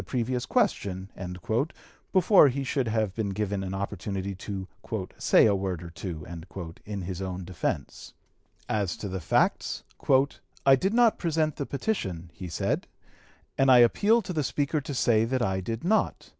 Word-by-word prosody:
273) 125 -3 -1
previous 125 +1 -2
question" 95 - -1 0.4
before 185 -3 +6
he 135 +1 -1
should 135 -2 -1
have 110 -3 0
been 105 -1 -2
given 100 -1 -2
an 95 0 -4
opportunity 100 0 -3
to 95 0 -6 0.5
"say - - +5
a 105 - +4
word 95 -3 -2
or 85 - -8
two" 85 -3 -6 0.6
in 100 -2 -4
his 90 +1 -5
own 95 -1 -4
defence. 90 -2 -4 0.6
As 100 -5 -1
to 105 - -5
the 95 0 -3
facts: - - +1 0.8
"I 135 0 +8
did 195 - 0
not 235 -2 +4
present 160 -3 0
the 140 - -3
petition," 95 - -3
he 90 +2 -7
said, 80 - -1 0.7
"and 135 0 +5
I 130 - +8
appeal 210 - +5
to 180 - -5
the 155 -3 0
Speaker 145 +2 0
to 140 - -5
say 115 -3 +3
that 125 +2 0
I 95 -2 0
did 115 +4 -4
not.... 215 +5 +1
110 Hz, 165 wpm, -27 LUFS, 95-140 Hz, 0.8 s, I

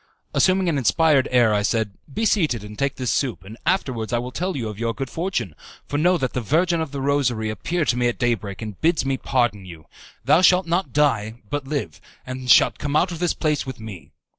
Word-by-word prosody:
Assuming 185 0 +3
an 155 -5 +1
inspired 145 +1 +3
air, 120 -4 +4
I 105 - +2
said, 110 0 0 0.2
"Be 220 +11 -1
seated 155 - +1
and 105 0 -9
take 140 +4 -1
this 125 -2 -2
soup, 125 -9 -1
and 100 +3 -10
afterwards 130 - 0
I 120 - +1
will 125 +2 -4
tell 180 +3 -3
you 115 -4 -3
of 105 -1 -7
your 115 -1 -1
good 135 -1 -5
fortune, 165 - -2 0.3
for 145 - -2
know 180 +3 +3
that 130 -5 -2
the 125 - -1
Virgin 165 - +1
of 160 -4 -4
the 140 - -5
Rosary 125 -6 0
appeared 160 - -2
to 125 - +2
me 120 0 +2
at 120 - -1
day 120 -1 +2
break, 100 -2 -6
and 105 -4 -8
bids 165 -3 +2
me 135 0 +1
pardon 120 -6 0
you. 85 -4 -11 0.4
Thou 165 - +5
shalt 185 0 +5
not 170 -3 -1
die 115 -6 +1 0.2
but 145 -2 -3
live, 135 - -4 0.2
and 130 0 -6
shalt - - +5
come 145 0 -2
out 180 +4 +3
of 170 - -6
this 175 -1 0
place 150 -3 -1
with 130 -4 -6
me." 110 -6 -9
130 Hz, 235 wpm, -22 LUFS, 115-160 Hz, 0.4 s, Thou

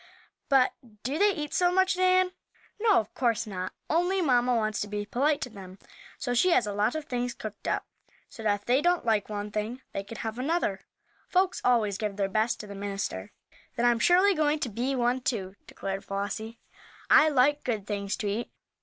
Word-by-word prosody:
"But 270 -2 +4 0.3
do 275 +6 -2
they 415 - +5
eat 300 -7 -3
so 355 -1 +3
much, 375 +1 +3
Nan?" 370 0 +3 0.5
"No, 425 -2 +4
of 335 - -6
course 235 -3 +1
not, 185 -3 -4 0.2
only 355 +4 +1
mamma 250 -6 +3
wants 215 -2 0
to 210 - -2
be 205 0 -3
polite 285 +7 +1
to 250 - -3
them, 190 -3 -11 0.4
so 245 - -2
she 305 +10 +4
has 290 -10 +4
a 205 - -3
lot 210 +5 +1
of 310 -1 -4
things 245 -1 -2
cooked 215 -1 -8
up, - - 0 0.4
so - - -11
that 205 -2 +1
if - - -29
they 255 +3 +3
don't 350 -2 +2
like 215 -3 +1
one 210 0 -4
thing 215 +5 -4
they 195 - -2
can 210 +3 -9
have 225 +2 -4
another. 270 - 0 0.5
Folks 370 0 +1
always 215 -5 +2
give 210 -3 -2
their 200 -1 0
best 220 +4 0
to - - -9
the 200 - -8
minister." 195 - -4 0.4
"Then 235 - +1
I'm 240 -1 +4
surely 370 +8 +5
going 305 -2 +2
to 245 - -1
be 245 +6 -1
one, 245 +1 +1
too," 195 -7 -2
declared 195 0 -5
Flossie. 210 +3 -4 0.5
"I 310 0 +7
like 290 +1 +3
good 220 -5 -2
things 200 -1 -3
to 210 - -3
eat. 210 +4 -3
235 Hz, 205 wpm, -28 LUFS, 205-295 Hz, 0.5 s, I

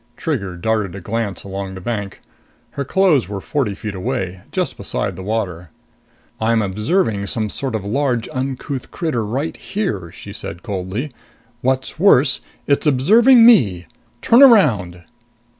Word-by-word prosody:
Trigger 100 - -3
darted 105 -1 -1
a - - -6
glance 105 -1 -3
along 95 0 -6
the - - -7
bank. 100 -1 -5 0.5
Her 140 - -3
clothes 155 - +2
were 100 -1 -4
forty 115 -2 -2
feet 105 0 -6
away, 95 -1 -3
just - - -2
beside 95 - -3
the 95 - -8
water. 95 -5 -3 0.7
"I'm 110 0 +2
observing 105 - 0
some 110 0 -2
sort 135 -4 -3
of 105 -2 -4
large, 125 +1 0
uncouth 130 +1 -4
critter 155 - -2
right 130 +9 -3
here!" 105 - -4
she - - -10
said 85 - -8
coldly. 100 +6 -4 0.5
"What's 130 +3 -1
worse, 140 -9 +4 0.2
it's 145 +2 +1
observing 225 - +6
me. 100 - +5 0.4
Turn 235 +3 +5
around!" 115 - +5
110 Hz, 140 wpm, -19 LUFS, 100-140 Hz, 0.7 s, observing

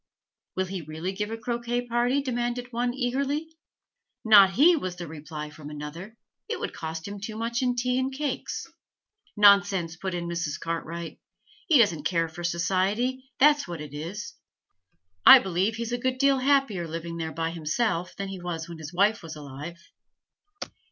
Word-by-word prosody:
'Will 190 - 0
he 185 -1 -5
really 160 +4 -5
give 210 +2 -3
a 225 - -4
croquet 240 +1 -2
party?' 245 +3 +1
demanded 245 -1 -2
one, 245 +1 0
eagerly. 280 +5 -2 0.7
'Not 200 -3 +8
he!' 325 - +6
was 185 - -3
the 175 -1 -6
reply 150 0 -7
from 150 0 -10
another. 160 +9 -8 0.3
'It 460 - -2
would - - -4
cost 160 +1 -5
him 200 0 -6
too 215 +1 -5
much 235 +2 -1
in 250 -1 +1
tea 250 +1 0
and 260 +1 -1
cakes.' 280 0 -3 0.7
'Nonsense!' 200 -5 +5
put 190 0 -3
in 170 -1 -3
Mrs. 170 -4 -3
Cartwright. 165 0 -5 0.5
'He 325 -5 +6
doesn't 170 - +3
care 165 0 +1
for 175 +2 -9
society, 195 +10 0
that's 290 -1 +5
what 170 -2 -6
it 150 -1 -8
is. 175 +8 -6 0.9
I - - +12
believe 190 +4 0
he's 230 0 -4
a 245 - -1
good 255 +1 -1
deal 275 0 +3
happier 260 -10 +2
living 165 +1 -5
there 160 -1 -3
by 165 0 -2
himself 170 +3 -1
than 195 0 -4
he 190 -2 -7
was 170 -2 -4
when 170 -1 -9
his 155 0 -7
wife 205 +4 +2
was 160 -2 -8
alive.' 150 +3 -8
195 Hz, 170 wpm, -27 LUFS, 165-245 Hz, 0.9 s, I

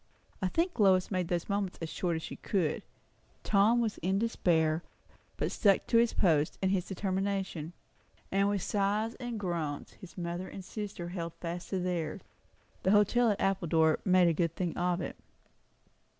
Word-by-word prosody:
I 190 - +2
think 335 - -1
Lois 190 -2 +4
made 185 -3 0
these 175 -1 -1
moments 200 -2 -1
as 165 - -4
short 170 +1 -1
as 160 - -4
she - - -6
could. 180 -7 0 0.6
Tom 215 +4 +4
was 220 -3 -2
in 190 +3 0
despair, 165 -7 +2 0.6
but - - -1
stuck 200 -3 +3
to 230 - +3
his 235 0 +3
post 155 -5 +2
and 190 -1 +1
his 185 -2 0
determination; 190 -4 -2 0.6
and 195 +1 +3
with 205 -3 -1
sighs 210 +3 0
and 240 -3 -4
groans 165 -7 -3
his 185 - -14
mother 175 +1 -3
and 190 - -8
sister 200 -5 -5
held 170 -2 -5
fast 175 +1 -6
to 190 - -1
theirs. 180 -3 -2 0.6
The - - +1
hotel 210 +4 +4
at 205 - 0
Appledore 165 -5 +2
made 185 -2 +5
a 170 - +3
good 165 0 0
thing 175 -3 -2
of 180 0 0
it. - - -5
185 Hz, 170 wpm, -31 LUFS, 170-200 Hz, 0.6 s, made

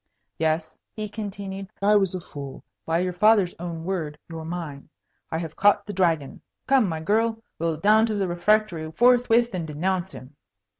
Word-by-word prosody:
"Yes," 160 0 -1 0.2
he 215 -1 -4
continued, 195 -2 -6
"I 205 +1 +4
was 195 -3 +2
a 180 - -4
fool. 140 -4 -9 0.2
By 165 0 +2
your 180 0 -1
father's 200 -1 +4
own 170 -2 -5
word 165 -5 -3
you're 165 -1 -7
mine. 160 -4 -6 0.4
I 160 - -1
have 160 -1 -5
caught 205 0 +4
the 205 - -6
Dragon. 165 -7 0 0.2
Come, 260 -7 +3
my 160 -1 -3
girl! 225 +5 +1 0.2
We'll 165 -1 0
down 215 +6 +4
to 215 - -1
the 195 -2 0
refectory 175 -2 +1
forthwith 240 0 +4
and 170 -3 -3
denounce 180 +4 -2
him." 130 +3 -11
185 Hz, 170 wpm, -25 LUFS, 160-210 Hz, 0.4 s, I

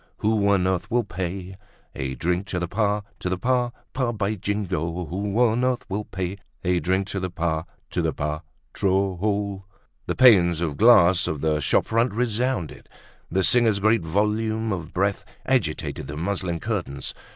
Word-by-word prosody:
who 105 -1 +1
on 100 -3 +3
earth 95 -2 -1
will 120 +1 +2
pay 95 +1 -5 0.4
A 65 0 -4
drink 90 +5 -1
to 90 - -3
the 85 -1 -1
pa—to 105 -1 -2
the 95 - -1
pa—pa—? 125 +2 -1
By 105 -1 -1
Jingo! 90 -4 -2
who 100 +5 -3
on 120 0 +3
earth 125 -1 0
will 105 +2 -2
pay 95 +1 -4 0.2
A 90 -1 +2
drink 95 +4 0
to 100 - -2
the 95 0 -3
pa—to 85 -2 -3
the - - +1
pa—tro—o—l?" 95 +6 -2 0.4
The - - -1
panes 90 -10 +6
of 80 -4 -2
glass 95 -6 +6
of 75 -2 -3
the 75 -1 +1
shop 75 - +2
front 115 +1 +1
resounded, 120 - -1 0.4
the 95 +2 +1
singers' 115 -1 +5
great 110 +1 +3
volume 105 +5 0
of 85 -4 -5
breath 100 +1 0 0.2
agitated 100 - -1
the 75 +2 -6
muslin 90 -1 -2
curtains. 70 -2 -3
95 Hz, 155 wpm, -24 LUFS, 85-110 Hz, 0.4 s, panes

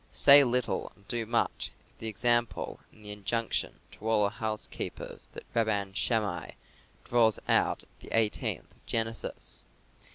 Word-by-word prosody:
"Say 140 0 +9
little 125 -1 0
and 100 -1 -25
do 115 -2 -2
much" 115 +1 0 0.2
is - - -22
the 115 - -4
example 120 +2 +1
and 110 - -18
the 105 - -5
injunction 110 +3 -2
to 110 - -6
all 110 -2 +4
our 100 - +1
housekeepers 110 0 -5
that - - -8
Rabban 105 -4 0
Shammai 105 -7 -1 0.5
draws 115 -3 +3
out - - +2
of - - -22
the - - -11
eighteenth 110 -2 0
of - - -27
Genesis. 115 0 -2
110 Hz, 150 wpm, -29 LUFS, 105-120 Hz, 0.5 s, Say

